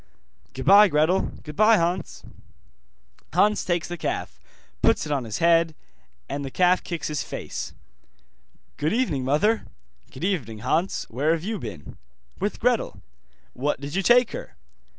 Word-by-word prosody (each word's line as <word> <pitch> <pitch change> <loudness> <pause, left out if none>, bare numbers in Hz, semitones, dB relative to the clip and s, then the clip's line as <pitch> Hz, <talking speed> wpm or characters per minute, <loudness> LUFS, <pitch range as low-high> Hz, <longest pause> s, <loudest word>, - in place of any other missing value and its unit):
'Goodbye, 200 +10 +7
Gretel.' 160 +3 +2
'Goodbye, 215 +9 +4
Hans.' 175 0 -2 1.1
Hans 210 +1 +3
takes 175 -2 -1
the 175 -1 -6
calf, 65 - -4 0.4
puts - - +3
it 150 - -5
on 135 -4 -1
his 110 -2 -4
head, 165 -1 +3 0.5
and 140 - -4
the 135 - -4
calf 180 +5 +2
kicks 170 -2 -4
his 150 -1 -2
face. - - -6 1.0
'Good 155 +5 0
evening, 185 - 0
mother.' 155 - +1 0.4
'Good 130 - -9
evening, 125 - -2
Hans. 170 +8 0
Where 145 +7 +1
have 165 -1 -3
you 215 +1 -3
been?' 100 - -9 0.4
'With - - -2
Gretel.' - - 0 0.5
'What 145 +3 -1
did 140 +1 -7
you 195 - +1
take 240 +4 +4
her? - - -8
165 Hz, 145 wpm, -24 LUFS, 140-190 Hz, 1.1 s, Goodbye